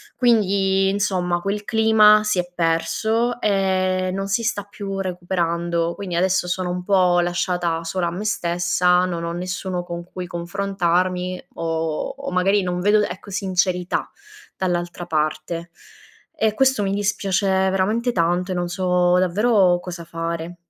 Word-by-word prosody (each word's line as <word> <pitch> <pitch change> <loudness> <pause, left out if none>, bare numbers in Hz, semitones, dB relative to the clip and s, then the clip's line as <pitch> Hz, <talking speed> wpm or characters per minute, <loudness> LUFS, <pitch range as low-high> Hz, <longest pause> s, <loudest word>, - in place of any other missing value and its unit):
Quindi, 195 -5 +2
insomma 185 -3 0
quel 200 +2 -2
clima 220 -1 +5
si 215 -3 0
è 175 0 -2
perso, 220 +9 0
ehm, 185 -2 +1
non 195 0 -3
si 230 +4 +1
sta 210 -3 -1
più 195 -1 -5
recuperando. 170 -2 -1
Quindi 185 -4 -5
adesso, 185 0 +1
sono 180 0 -2
un 180 - -6
po' 180 -2 +3
lasciata 175 -1 -1
sola 175 +1 -1
a - - -2
me 180 +5 -5
stessa, 180 -2 +2
non 170 -2 -3
ho 170 - -3
nessuno 180 +1 -3
con 175 0 -6
cui 180 0 -7
confrontarmi 180 0 -1
o 165 -1 -2 0.3
o 280 -5 -5
magari 195 +3 +2
non 180 0 -2
vedo, 210 +2 +4
ecco, 200 0 -5
sincerità 185 -2 -1 0.5
dall'altra 175 -1 -2
parte. 155 +1 -2 0.7
E 220 -8 +1
questo 265 -2 +2
mi 195 0 -1
dispiace 200 -1 0
veramente 190 +5 +1
tanto 175 -1 0
e - - -1
non 175 0 -1
so 180 -1 +2
davvero 185 -1 +3
cosa 175 -1 -7
fare. 165 +1 -5
185 Hz, 145 wpm, -21 LUFS, 175-200 Hz, 0.7 s, clima